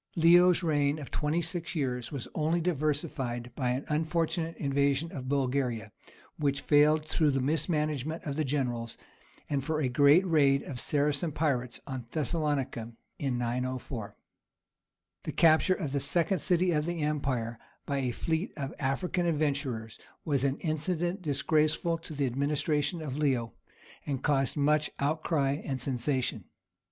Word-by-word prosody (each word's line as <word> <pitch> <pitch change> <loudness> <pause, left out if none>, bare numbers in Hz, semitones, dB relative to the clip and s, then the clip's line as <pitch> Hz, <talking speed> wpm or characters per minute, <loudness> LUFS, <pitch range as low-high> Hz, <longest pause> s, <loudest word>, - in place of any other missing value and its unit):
Leo's 175 +2 +6
reign 145 -2 +2
of 145 -3 -8
twenty 155 +3 0
six 170 0 -3
years 125 -5 -2
was 140 -5 -5
only 160 +2 +1
diversified 145 -7 -2
by 125 -3 0
an 130 +3 -1
unfortunate 165 +1 -1
invasion 140 +2 +1
of 130 -2 -6
Bulgaria, 130 -5 0 0.5
which 140 -2 0
failed 150 +1 +4
through 155 -1 +2
the 135 -1 +1
mismanagement 155 +1 -1
of 140 -2 -3
the 155 - 0
generals, 125 -5 -2 0.5
and 140 -2 -1
for 160 0 -1
a 135 -4 +1
great 145 +8 +5
raid 140 -5 +3
of 130 -3 -6
Saracen 150 +4 0
pirates 135 -5 -1
on 130 -4 -6
Thessalonica 145 -6 -2 0.3
in 135 -4 -1
904. 120 -2 -3 1.1
The - - -4
capture 165 +3 +5
of 155 -8 -4
the 140 - 0
second 165 +6 +2
city 180 +2 +2
of 150 -1 0
the 170 -3 -2
empire 130 -6 -1 0.3
by 140 -1 -1
a 130 -2 0
fleet 160 - -2
of 140 -2 -4
African 175 +6 0
adventurers 140 -8 -1 0.3
was 140 -4 +1
an 140 0 +1
incident 175 +3 -1
disgraceful 155 +2 +1
to 160 -1 -9
the 140 -1 +1
administration 145 +4 0
of 140 -2 -4
Leo, 130 -6 0 0.5
and 135 -3 -2
caused 135 -1 +1
much 150 +1 +2
outcry 145 -1 0
and 135 -2 -3
sensation. 130 +1 -1
145 Hz, 145 wpm, -30 LUFS, 135-160 Hz, 1.1 s, Leo's